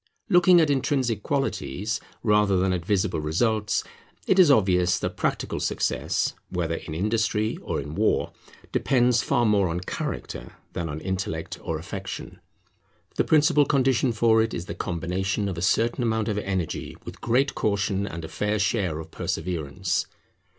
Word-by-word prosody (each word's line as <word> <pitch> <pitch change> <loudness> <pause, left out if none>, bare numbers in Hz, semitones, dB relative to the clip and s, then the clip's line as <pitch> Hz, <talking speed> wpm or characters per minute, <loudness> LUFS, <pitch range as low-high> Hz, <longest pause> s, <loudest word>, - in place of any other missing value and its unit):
Looking 180 -1 +6
at 155 -3 +3
intrinsic 130 -5 0
qualities 105 - -2 0.2
rather 105 -3 +3
than 95 0 +2
at 90 -2 -2
visible 100 -1 0
results, 105 +7 +1 0.4
it 190 - +3
is 180 -5 +8
obvious 90 -7 +4
that - - -3
practical - - -1
success, - - 0 0.2
whether 85 -2 -1
in 80 -1 -5
industry 105 +3 0
or - - -2
in 75 +1 -6
war, - - +1 0.4
depends 125 -3 +3
far 120 - +1
more 100 -4 +3
on 85 +2 -2
character - - -5 0.2
than 85 -2 -3
on 75 +1 -5
intellect 95 -3 -3
or - - -3
affection. - - -7 0.8
The - - +4
principal 150 -1 +4
condition 130 -2 +2
for 110 0 +4
it 115 - -1
is 85 - -4
the - - -5
combination 95 +4 -2
of 95 - -3
a 85 - -5
certain 115 +7 +2
amount 110 -2 0
of 105 -1 0
energy 95 -5 -3
with - - -9
great 130 +4 +2
caution, 100 -1 0
and 85 -4 -6
a - - -6
fair 105 +4 -1
share 100 -6 0
of 80 0 -8
perseverance. 90 +2 -2
105 Hz, 155 wpm, -25 LUFS, 90-120 Hz, 0.8 s, is